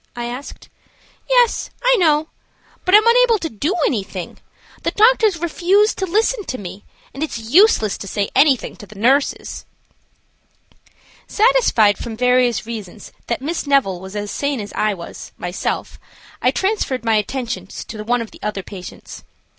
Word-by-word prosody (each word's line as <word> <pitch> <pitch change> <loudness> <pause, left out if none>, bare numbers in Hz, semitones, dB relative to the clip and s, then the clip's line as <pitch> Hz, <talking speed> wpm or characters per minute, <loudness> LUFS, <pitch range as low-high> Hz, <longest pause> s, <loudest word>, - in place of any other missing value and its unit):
I 240 0 -4
asked. 250 +4 -8 0.6
"Yes, - - +3
I - - +5
know; 315 -2 +3 0.6
but 370 +2 +5
I - - +12
am 430 - +3
unable 470 -1 +5
to 330 -5 -4
do 295 - -1
anything. 195 -6 -3 0.4
The - - 0
doctors 440 -3 +4
refuse 360 +5 +2
to 380 - -3
listen 430 +4 +1
to 255 - -4
me, 190 -1 -9 0.3
and 275 - -8
it 310 -6 -2
is 225 0 -9
useless 350 - +4
to 195 - -7
say 200 +1 -2
anything 275 -4 +3
to 205 - -12
the 210 - -14
nurses." 265 +7 +1 1.6
Satisfied 430 - +3
from 225 -2 -6
various 250 -1 +2
reasons 215 -3 -8 0.2
that 240 +2 -2
Miss 320 0 -3
Neville 265 -11 +2
was 190 +2 -9
as 205 0 -4
sane 280 -2 -2
as 205 -1 -7
I 215 -1 0
was 170 -2 -10
myself, 180 +1 -4 0.4
I - - +4
transferred 380 - -1
my 225 -1 +3
attentions 210 -4 -4
to 215 -2 -7
one 240 +2 0
of 225 - -12
the - - -15
other 210 -2 -3
patients. 185 -2 -10
250 Hz, 160 wpm, -19 LUFS, -, 1.6 s, I